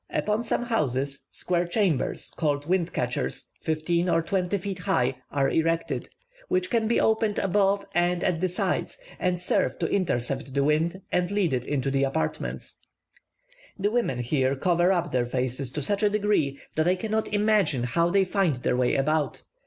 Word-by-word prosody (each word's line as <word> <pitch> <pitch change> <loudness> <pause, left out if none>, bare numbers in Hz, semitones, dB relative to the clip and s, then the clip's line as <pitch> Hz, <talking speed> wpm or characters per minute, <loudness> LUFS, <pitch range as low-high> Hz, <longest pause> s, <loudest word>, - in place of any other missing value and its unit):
Upon 210 +1 0
some 235 +1 -1
houses, 140 - -1
square 175 -1 -1
chambers 175 - 0
(called 145 -3 0
wind 180 -1 +1
catchers), 120 - -2
fifteen 170 +3 0
or 165 -1 +2
twenty 190 +1 0
feet 195 0 -5
high, 135 -10 +1 0.2
are 140 -1 +1
erected, 165 +2 0 0.4
which 185 0 0
can 225 -2 +2
be 235 - +2
opened 220 -1 +2
above 200 +1 +2
and 175 +1 +1
at 170 -2 0
the 185 - +1
sides, 180 - -1 0.2
and 180 -1 0
serve 180 - +1
to 170 - -1
intercept 135 -7 -1
the 140 - +3
wind 165 +6 +1
and 180 0 +1
lead 200 -6 +1
it 125 -1 -1
into 135 -2 -1
the 135 0 +1
apartments. 135 +4 -3 1.0
The 205 +1 0
women 230 - 0
here 130 +2 +1
cover 175 +5 +2
up 175 -2 0
their 125 -1 +1
faces 130 +1 -2
to 150 - -3
such 200 +8 0
a 210 - +4
degree 205 -10 +1 0.2
that 155 +2 +2
I 180 - +4
cannot 220 +3 -1
imagine 205 - +2
how 170 +8 +1
they 195 +1 +3
find 185 -5 +1
their 125 0 0
way 125 0 +2
about. 150 +2 0
170 Hz, 175 wpm, -26 LUFS, 140-195 Hz, 1.0 s, a